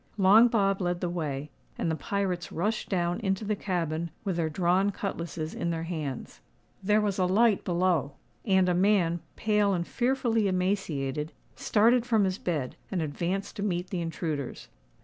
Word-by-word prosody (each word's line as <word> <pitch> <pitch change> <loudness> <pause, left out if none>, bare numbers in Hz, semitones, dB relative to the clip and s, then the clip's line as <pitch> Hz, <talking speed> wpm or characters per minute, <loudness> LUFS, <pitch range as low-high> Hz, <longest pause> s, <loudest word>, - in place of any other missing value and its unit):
Long 205 +4 +7
Bob 195 -4 +1
led 175 -1 -1
the 175 -1 -2
way; 150 -4 -3 0.3
and 165 - 0
the - - 0
pirates 180 +2 -2
rushed 210 +7 -2
down 175 -2 0
into 195 -1 -1
the 210 +1 0
cabin, 170 -4 -2
with 190 -4 -2
their 165 -2 0
drawn 180 +4 +2
cutlasses 170 -5 -4
in 170 - -2
their 165 -1 -2
hands. 155 -6 -5 0.4
There 210 +2 +3
was 205 -2 -1
a 185 - +3
light 210 +2 +3
below; 170 -6 +1 0.3
and 190 -3 +3
a 180 - +3
man, 180 -2 +2 0.2
pale 210 -2 +2
and 170 -1 -2
fearfully 240 -3 +1
emaciated, 165 -7 -1 0.2
started 230 +3 +3
from 225 -3 +2
his 190 0 -1
bed, 150 -8 -2
and 185 - -2
advanced 170 +5 -2
to - - -3
meet 180 -3 -2
the 180 -3 -2
intruders. 160 -5 -4
185 Hz, 170 wpm, -28 LUFS, 165-200 Hz, 0.4 s, Long